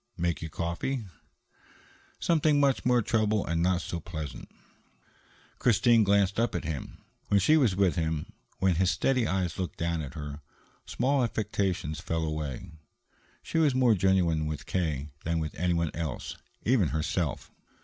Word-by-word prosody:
"Make 85 -1 -1
you 80 - -5
coffee?" 85 - -3 1.1
"Something 155 -3 +3
much 140 -2 +2
more 125 -2 +4
trouble 110 -2 +1
and 85 0 0
not 90 +1 +1
so 85 - -4
pleasant." 80 -4 -7 1.1
Christine 115 0 +4
glanced 100 0 +2
up 120 - +1
at - - -2
him. 80 -4 -5 0.3
When 100 - +4
she 150 +12 +4
was 125 -11 +3
with 95 -2 +2
him, 80 -2 -2 0.2
when 95 -3 +2
his 95 0 +3
steady 130 0 +1
eyes 90 -1 -1
looked 90 -5 -3
down 85 -1 -1
at 70 -4 -7
her, 75 -1 -6 0.5
small 135 0 +1
affectations 95 - -1
fell 80 0 -2
away. 75 +1 -4 0.7
She 165 - -1
was 150 -5 +3
more 125 -3 +5
genuine 90 -5 +2
with 75 -1 -5
K. 75 -6 -2
than 85 0 0
with 80 -1 -3
anyone 85 -2 0
else, 80 -6 -4 0.3
even 115 -7 +3
herself. 80 -1 -2
90 Hz, 150 wpm, -28 LUFS, 80-110 Hz, 1.1 s, more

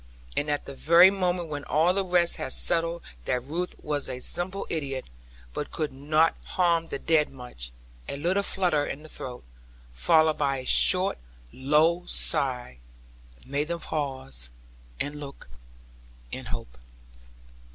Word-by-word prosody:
And 145 - 0
at 145 0 -1
the 140 - -7
very 170 +6 +7
moment 180 -3 -1
when 145 -2 -5
all 165 +4 +3
the 195 +1 +1
rest 175 -2 +3
had 130 - -1
settled 165 0 +3 0.2
that 125 -1 0
Ruth 170 +7 -3
was 145 -2 -1
a 130 - -4
simple 185 +8 0
idiot, 135 -5 -3 0.5
but - - -4
could 155 -4 -3
not 155 +4 +2
harm 170 -2 +1
the 140 - -3
dead 155 0 +2
much, 125 - -9 0.4
a - - -3
little 180 +7 +1
flutter 180 -7 +1
in 145 +1 -5
the 155 - -12
throat, 125 -4 -8 0.5
followed 155 - +3
by 140 -2 +1
a 130 - -7
short 185 +7 +3 0.3
low 155 +6 +3
sigh, 125 - +1 0.7
made 145 +3 -1
them 170 0 -3
pause, 130 - -4 0.5
and 145 +1 -3
look 140 -1 -9 0.9
and - - -6
hope. - - -7
150 Hz, 145 wpm, -27 LUFS, 135-170 Hz, 0.9 s, very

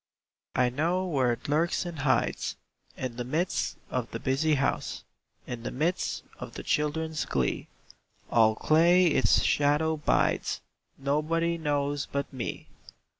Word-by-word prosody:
I 125 -1 +3
know 170 +8 0
where 135 -8 +2
it 120 +1 -4
lurks 160 +5 +1
and 170 -3 -6
hides, 135 -1 +1 0.4
In 125 -2 -4
the 120 - -2
midst 155 +9 -1
of 125 -2 -2
the 115 - -5
busy 145 +5 +2
house, 140 0 -1 0.4
In 120 -2 -5
the - - -4
midst 160 +7 -1 0.2
of - - -7
the - - -6
children's 155 +1 0
glee, 65 -2 -1 0.6
All 110 -2 +5
clay 170 +7 +5
its 150 -5 +4
shadow 150 +2 +2
bides: 150 - +1 0.4
Nobody 155 +4 0
knows 145 -2 -1
but 140 0 -3
me. 125 -3 -4
145 Hz, 135 wpm, -28 LUFS, 130-160 Hz, 0.6 s, All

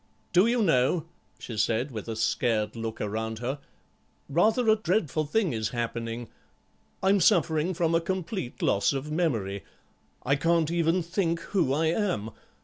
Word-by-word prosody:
"Do 180 +5 +5
you 235 -1 +2
know," 155 0 +2 0.3
she 115 - -7
said, 115 +5 +1
with 110 -2 -6
a 115 - -3
scared 110 -1 0
look 115 -1 -5
around 110 +2 -3
her, 130 +5 -3 0.7
"rather 215 - +2
a 220 - +6
dreadful 170 -7 0
thing 180 - 0
is 110 -1 -1
happening. 115 0 -4 0.8
I'm 195 +1 +4
suffering 170 -2 +3
from 165 0 +1
a 165 - +3
complete 185 - -4
loss 100 +7 +2
of 140 +2 -4
memory. 115 - -1 0.6
I 140 +2 +2
can't 165 +1 +2
even 170 +1 +1
think 170 -1 -1
who 175 -6 0
I 155 +4 +1
am. 170 - -1
155 Hz, 150 wpm, -27 LUFS, 115-175 Hz, 0.8 s, a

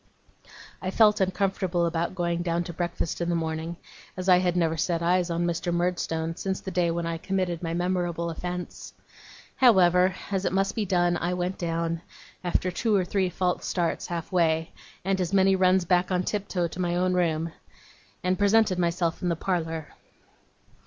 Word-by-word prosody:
I 185 - -2
felt 210 +1 +4
uncomfortable 190 -2 0
about 170 +2 -1
going 170 -1 -1
down 170 0 0
to 175 - -7
breakfast 175 0 -3
in 170 - 0
the 170 - +1
morning, 160 +1 -3 0.4
as 185 0 -4
I 180 -1 +7
had 180 -1 0
never 165 -2 +2
set 170 +1 -1
eyes 180 +1 +2
on 170 0 0
Mr. 170 0 -1
Murdstone 170 -2 -1
since 190 +1 -3
the 190 - -6
day 175 -1 +1
when 170 0 -2
I 165 -1 -3
committed 185 -2 -2
my 165 -1 -2
memorable 175 -1 -1
offence. 180 +2 -6 0.6
However, 185 -6 +5 0.2
as 195 -1 0
it 185 - 0
must 195 +1 +1
be 220 - -1
done, 175 -1 +2
I 175 +1 -1
went 180 +1 -3
down, 165 -1 -2 0.4
after 180 +1 0
two 215 +4 +1
or 190 -2 +2
three 190 0 0
false 180 0 -1
starts 175 -3 -1
half 170 0 -5
way, 165 -3 +1 0.3
and 190 -1 +1
as 180 +1 -2
many 195 0 +5
runs 185 -1 +3
back 180 +1 +2
on 180 -1 +1
tiptoe 190 -3 -1
to 175 - -9
my 175 -1 0
own 180 +1 +1
room, 165 -2 0 0.7
and 185 +1 0
presented 205 -2 +3
myself 170 0 0
in 180 - 0
the 170 - +1
parlour. 165 -3 -2
175 Hz, 180 wpm, -26 LUFS, 170-185 Hz, 0.7 s, I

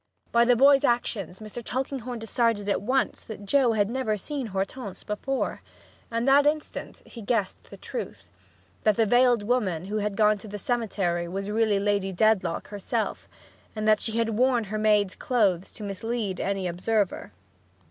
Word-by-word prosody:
By 235 0 +5
the 245 0 +5
boy's 275 +2 +6
actions 205 -7 0
Mr. 215 +3 -7
Tulkinghorn 255 -1 -3
decided 225 -2 0
at 200 - +1
once 255 +3 0
that 210 -2 -8
Joe 255 +1 +3
had 205 -2 +2
never 230 -2 -1
seen 275 +4 -4
Hortense 195 +1 -4
before, 260 +6 -2 0.5
and 230 +2 -1
that 280 +2 +6
instant, 305 0 -3
he 235 - -10
guessed 210 -2 -1
the - - -12
truth 485 - -7 0.5
that 215 -2 +3
the 225 - +3
veiled 245 0 +4
woman 205 -8 0
who 210 +2 -3
had 210 -1 -2
gone 210 -1 +4
to 215 - -11
the 205 0 -6
cemetery 195 -7 -1
was 195 +3 -4
really 215 -2 +2
Lady 200 -1 0
Dedlock 190 -3 +1
herself, 205 -2 -3 0.5
and 215 0 -2
that 215 -1 +4
she 220 - -3
had 230 -1 +1
worn 245 +1 +2
her 215 - -1
maid's 210 -3 +3
clothes 200 -8 +1
to 215 - -9
mislead 205 0 -3
any 195 -2 -1
observer. 190 - -1
215 Hz, 170 wpm, -26 LUFS, 200-240 Hz, 0.5 s, boy's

